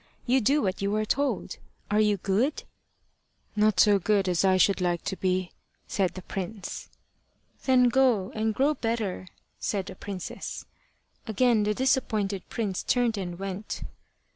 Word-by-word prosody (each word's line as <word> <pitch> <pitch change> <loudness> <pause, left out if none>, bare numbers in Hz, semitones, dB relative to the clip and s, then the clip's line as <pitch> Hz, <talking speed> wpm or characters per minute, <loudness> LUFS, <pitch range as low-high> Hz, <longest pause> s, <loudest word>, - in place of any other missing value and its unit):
You 255 +2 +3
do 280 +7 +3
what 190 -1 -1
you 200 +1 0
are 215 0 0
told. 280 +5 -1 0.3
Are 210 - +3
you 210 -1 +3
good?" 205 - 0 0.9
"Not 215 0 +3
so 205 -2 +6
good 200 0 +2
as 180 -1 +2
I 190 -1 +4
should 195 0 +3
like 175 -1 0
to 190 - -2
be," 185 -1 -1 0.3
said 185 -3 -1
the 185 - -7
prince. 195 +1 -6 0.8
"Then 255 -2 +5
go 240 -6 +3
and 220 0 -1
grow 285 +3 +3
better," 225 -8 -2 0.3
said 195 -3 -1
the 190 - -8
princess. 190 -1 -6 0.6
Again 225 +1 +3
the 210 0 +1
disappointed 215 -7 +1
prince 205 -6 -2
turned 245 -3 +1
and 180 -3 -4
went. 195 +2 -5
205 Hz, 150 wpm, -27 LUFS, 190-230 Hz, 0.9 s, so